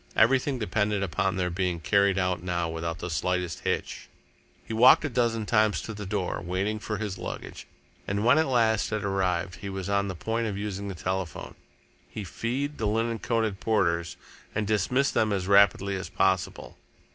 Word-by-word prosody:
Everything 130 +4 +3
depended 105 -3 0
upon 95 +1 0
their 90 -1 -1
being 90 -1 -1
carried 100 +3 +3
out 90 -1 0
now 85 -1 -1
without 80 0 -4
the 90 - -5
slightest 90 +2 -1
hitch. - - -3 0.6
He - - -6
walked 125 +6 +7
a - - -1
dozen 115 -3 0
times 110 -1 +2
to 110 - -6
the 105 -1 -7
door, 95 -3 -2
waiting 95 +4 -1
for 105 0 -4
his 100 -3 -4
luggage, - - -7 0.4
and 100 +2 -1
when 130 +6 +6
at 160 - +2
last 115 -5 +2
it 110 -1 -2
arrived 90 -3 -1
he 100 - -6
was 95 -1 -5
on 100 0 +1
the 95 - -4
point 115 +6 -2
of 100 -2 -3
using 100 -1 -4
the 95 - -5
telephone. 95 -2 -4 0.6
He 105 - -6
feed 130 +9 -3
the 110 - 0
linen 115 +2 0
coated 110 -4 -1
porters 85 -6 0 0.4
and 105 0 0
dismissed 110 +7 +1
them 110 -1 +2
as 95 -2 -1
rapidly 100 0 +4
as 95 - -6
possible. 95 -2 -1
100 Hz, 180 wpm, -27 LUFS, 95-110 Hz, 0.6 s, walked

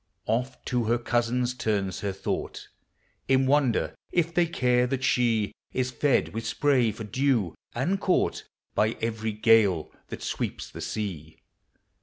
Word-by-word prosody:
Oft 125 +3 -2
to 120 -2 0
her 120 +2 +2
cousins 120 +1 0
turns 105 -6 -1
her 100 - -2
thought, 95 - -4 0.6
In 135 0 +4
wonder 135 -3 +2 0.2
if 170 -1 +1
they 175 0 +3
care 125 -5 +2
thai 135 +1 0
she 120 -5 +1 0.2
Is 130 0 0
fed 140 +1 +2
with 115 +1 -3
spray 130 -5 +2
for 105 +2 -7
dew. 115 - +1 0.2
and 175 +11 0
caught 185 - +1 0.3
By 110 +2 +1
every 110 -1 -2
gale 105 -6 +3 0.2
that - - -7
sweeps - - -3
the - - -8
sea. 85 -8 -4
120 Hz, 145 wpm, -27 LUFS, 110-130 Hz, 0.6 s, In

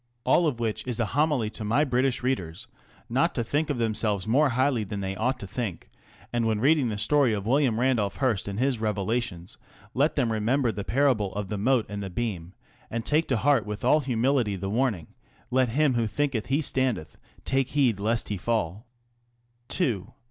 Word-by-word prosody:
All 170 - +3
of 130 -6 -2
which 115 +1 -2
is 125 -1 -2
a 115 - +2
homily 145 -7 +1
to 110 - -6
my 115 +8 +2
British 130 -2 0
readers 90 -11 -2 0.4
not - - +1
to 120 - 0
think 145 +7 -1
of 145 - -1
themselves 110 -4 0
more 135 +7 +3
highly 130 -2 +1
than 100 0 -5
they 95 0 -3
ought 125 +6 0
to 105 - -8
think, 100 -4 -5 0.4
and 120 -1 +1
when 110 -2 +1
reading 140 +2 +3
the 105 - -3
story 130 +2 +3
of 100 -2 -2
W. 135 +5 +3
Randolph 115 -3 0
Hearst 120 -9 0
and 100 0 -4
his 130 -1 +1
revelations 105 -3 -2 0.3
let 145 +5 +2
them 125 -6 +1
remember 115 +3 +1
the 100 -1 -5
parable 115 -2 +1
of 105 -1 -4
the 105 - -2
mote 125 +1 +2
and 105 0 -5
the 95 - -4
beam, 95 -4 -4 0.4
and 115 0 -4
take 155 +2 +1
to 130 - +1
heart 135 -2 +2
with 105 +2 -5
all 150 +5 +5
humility 125 -4 +1
the 95 +1 -4
warning, 110 -8 0 0.5
Let 130 -1 +3
him 140 +3 +2
who 115 -2 +1
thinketh 130 0 -1
he 140 +3 +1
standeth 130 - -1 0.3
take 135 -1 +1
heed 130 -9 +1
lest 115 +3 0
he 105 - -2
fall. 110 +1 -2 0.9
II. 115 - 0
115 Hz, 195 wpm, -26 LUFS, 105-135 Hz, 0.9 s, all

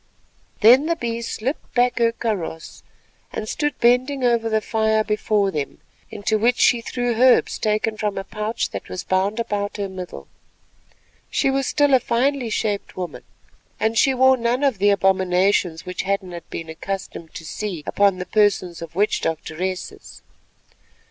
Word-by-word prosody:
Then 250 +7 +7
the 335 - +1
Bee 235 -5 -3
slipped 235 +4 -4
back 245 0 +2
her 230 -1 +3
kaross, 200 -9 -4 0.5
and 215 - -5
stood 295 +5 -2
bending 255 +3 +2
over 235 -2 +2
the 220 0 +2
fire 220 0 +1
before 210 -2 +1
them, 150 -5 -4 0.3
into 215 +1 -1
which 240 +3 +2
she 240 - +4
threw 245 +1 -2
herbs 250 +2 +4
taken 215 +1 0
from 210 -1 -2
a 195 - -2
pouch 215 +3 -3
that - - -7
was 185 - -5
bound 195 +4 0
about 205 -2 -2
her 200 -1 -2
middle. 180 - -8 1.0
She 270 - +1
was 270 -1 0
still 290 -2 +2
a 260 - +7
finely 250 +1 0
shaped 210 -3 -2
woman, 180 -2 -5 0.6
and 220 +1 +1
she 265 +3 +3
wore 260 +1 +5
none 240 +3 0
of 265 -8 +1
the 205 +1 +4
abominations 190 -3 +2
which 180 - -3
Hadden 195 -1 -2
had 170 -1 -9
been 165 - -6
accustomed 170 -1 -6
to 165 - -7
see 180 -1 -5
upon 200 -2 +2
the 180 - -5
persons 195 -4 +1
of 165 -1 -9
witch 205 +3 +1
doctoresses. 175 +3 -4
215 Hz, 160 wpm, -22 LUFS, 190-240 Hz, 1.0 s, Then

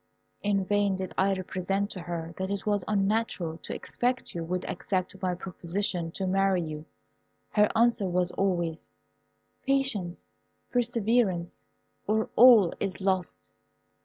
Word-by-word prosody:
In 200 -2 +1
vain 205 -1 +2
did 190 -1 -5
I 195 +1 +2
represent 190 +2 -2
to 185 - -5
her 170 -1 -5
it 195 +1 -3
was 205 -3 +1
unnatural 200 -5 0
to - - -6
expect 250 +1 -2
you 170 - -3
would 180 +2 -3
accept 185 0 -3
my 180 -1 0
proposition 180 -1 -2
to 195 - -2
marry 190 -1 +2
you. 155 -1 -6 0.7
Her 210 -1 +4
answer 230 -3 +3
was 180 0 +1
always, 175 -4 -1 0.7
"Patience, 265 -11 0 0.5
perseverance, 230 -7 +1 0.5
or 220 +1 0
all 230 -7 +8
is 195 -2 -2
lost." 190 -2 -1
195 Hz, 130 wpm, -28 LUFS, 180-210 Hz, 0.7 s, all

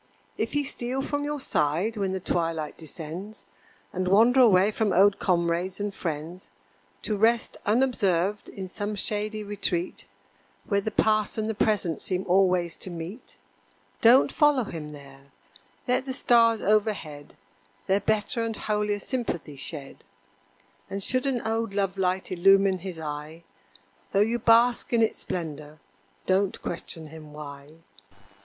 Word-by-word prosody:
If - - -3
he 290 0 +1
steal 260 0 -3
from 290 0 -2
your 295 0 -3
side 170 - 0
when 195 -3 -1
the 190 - -2
twilight 165 -4 -2
descends, 165 +7 -8 0.5
And 185 0 -2
wander 230 +7 +5
away 205 -4 +6
from 215 -1 0
old 195 +2 +4
comrades 175 +1 0
and 205 0 -2
friends, 165 +1 -5 0.5
To 215 - -1
rest 225 +3 +2
unobserved 205 -5 +1
in 190 -1 -7
some 205 +3 -4
shady 210 +1 -2
retreat, 195 -4 -3 0.6
Where 200 -2 +1
the 220 - -2
past 215 -1 +1
and 215 0 -1
the 220 - -1
present 200 -6 0
seem 185 0 -1
always 180 -2 +3
to - - -7
meet, 175 +7 -8 0.6
Don't 250 +4 +6
follow 295 -4 +3
him 155 -7 -7
there; 140 -1 -14 0.6
let 255 +1 +1
the 260 - -2
stars 230 -4 +4
overhead 200 -9 -1 0.5
Their 195 +1 +2
better 220 +2 0
and 225 -2 -3
holier 210 -1 -1
sympathy 205 - -4
shed 140 0 -6 0.9
And 195 0 -4
should 255 +5 +1
an 255 -3 -1
old 225 -2 -1
love 195 -1 -1
light 185 0 0
illumine 195 +1 +4
his 180 -2 -6
eye, 155 +2 -6 0.7
Though 195 - +4
you 230 +3 +1
bask 235 +2 +4
in 230 -1 +4
its 220 - 0
splendor 155 -3 -5 0.5
don't 190 +1 +1
question 165 -1 -5
him 155 -1 -12
why. 145 -1 -10
195 Hz, 145 wpm, -26 LUFS, 170-220 Hz, 0.9 s, away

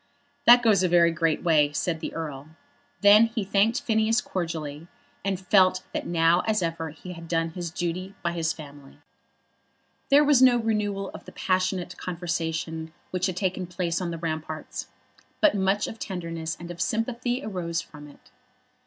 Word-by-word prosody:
"That 240 +1 +9
goes 210 -5 +4
a 185 - +2
very 170 -1 +5
great 165 -1 0
way," 150 -4 +4
said 160 +2 -1
the 155 - -5
Earl. 150 -3 -6 0.5
Then 210 +2 +7
he 225 -2 -3
thanked 210 +7 +2
Phineas 220 -3 +2
cordially, 165 -5 -4 0.4
and 195 -1 -1
felt 185 -1 +3
that - - -3
now 165 0 +3
as 215 -4 +1
ever 165 -1 -3
he 180 +4 -9
had 165 -1 -10
done 165 0 0
his 175 0 -5
duty 175 +3 -4
by 170 - 0
his 165 -2 -1
family. 145 -3 -11 1.1
There 285 +2 +6
was 290 -3 +4
no 255 -2 +7
renewal 210 -3 -1
of - - -11
the - - -11
passionate 185 -1 -1
conversation 165 -2 -3 0.2
which 185 +1 0
had 185 -2 -4
taken 185 -1 -1
place 170 0 -2
on 180 - -2
the 165 - -4
ramparts, 160 -1 -5 0.5
but 310 - +5
much 195 +1 +1
of 225 - -7
tenderness 165 -4 -4
and 175 +1 -7
of 175 0 -7
sympathy 245 +3 -1
arose 175 -5 -3
from 150 -2 -10
it. 145 - -19
175 Hz, 170 wpm, -26 LUFS, 165-205 Hz, 1.1 s, That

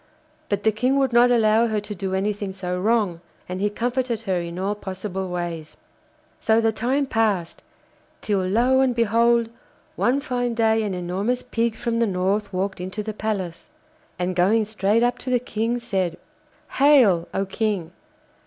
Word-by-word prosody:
But 205 -1 -1
the 220 - +4
King 250 +6 +1
would 270 -3 +1
not 240 +1 +6
allow 225 -1 +4
her 215 -2 0
to 210 0 -7
do 190 -1 -3
anything 200 0 -2
so 180 -1 -3
wrong, 205 -4 +1 0.3
and 185 +1 -4
he 205 - +2
comforted 240 +1 -2
her 190 -4 0
in 170 0 -6
all 195 +2 -1
possible 190 -1 -5
ways. 170 -3 -5 0.6
So 220 0 +3
the 225 -1 +2
time 255 +6 0
passed, 215 -8 0 0.6
till 205 -2 0
lo 240 +8 +3
and 260 -2 +2
behold! 230 0 +2 0.4
one 255 +3 +2
fine 245 -4 -2
day 225 -1 +3
an 205 -3 -2
enormous 190 +8 -2
pig 235 -2 -1
from 230 0 -2
the 230 - +2
North 195 +2 -1
walked 190 0 -2
into 190 +4 -4
the 215 0 -4
palace, 200 - -4 0.5
and 180 0 -2
going 210 +5 +3
straight 215 +1 +1
up 245 0 +1
to 260 - -6
the 250 -1 +3
King 230 0 -2
said, 190 -7 -2 0.5
'Hail! 255 - +5
oh 195 - -1
King. 195 -4 -2
215 Hz, 170 wpm, -23 LUFS, 190-235 Hz, 0.6 s, not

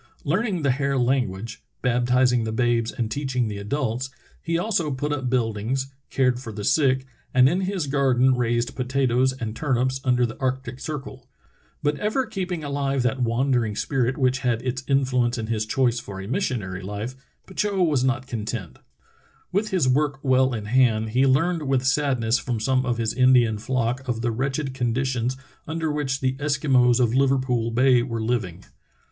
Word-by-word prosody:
Learning 185 +2 0
the 140 - +3
Hare 140 +1 0
language, 115 -3 -1 0.2
baptizing 125 0 +2
the 110 - -2
babes 120 0 +1
and 115 -2 -3
teaching 130 -3 -1
the 105 -1 -5
adults, 125 +3 -2 0.3
he 165 0 -1
also 175 -4 0
put 145 +2 -2
up 130 -3 -2
buildings, 125 +2 -1 0.2
cared 125 -2 +1
for 120 -3 -7
the 105 -1 -6
sick, 130 0 +2 0.3
and 130 0 +7
in 175 +7 +1
his 190 -3 -1
garden 130 -2 +3
raised 120 -1 0
potatoes 130 0 +1
and 115 -4 -5
turnips 130 -1 0
under 125 -2 +3
the 115 - -5
arctic 130 -1 -2
circle. 135 -4 -7 0.5
But 145 0 0
ever 220 +5 0
keeping 185 -6 -4
ahve 140 -2 -1
that 125 +1 0
wandering 120 -2 +1
spirit 130 0 0
which 130 -1 +2
had 120 -3 -1
its 130 0 -3
influence 125 -3 +1
in 110 - -3
his 110 -1 -2
choice 120 0 +1
for 100 -4 -8
a 95 - -7
missionary 110 - -2
life, 105 +5 -5 0.3
Petitot 195 -1 0
was 145 -6 +1
not 130 0 0
content. 110 -6 -5 0.7
With 210 +3 0
his 185 -9 +1
work 140 +2 +2
well 130 -1 +3
in 105 -2 -5
hand 110 -2 +2
he 130 +4 +3
learned 160 +3 +1
with 135 -1 +1
sadness 130 -4 +2
from 120 -1 -3
some 130 +3 +1
of 120 -1 0
his 115 -2 -1
Indian 125 -4 +4
flock 130 +2 -1
of 115 -2 -2
the 120 0 0
wretched 135 +3 -2
condi 125 0 0
tions 130 0 -1 0.3
under 160 0 -2
which 140 -2 -2
the 130 -1 +1
Eskimos 135 -4 +3
of 120 -2 +2
Liverpool 130 -3 +2
Bay 125 +1 +4
were 115 -2 -3
living. 110 -7 -2
130 Hz, 175 wpm, -24 LUFS, 120-135 Hz, 0.7 s, and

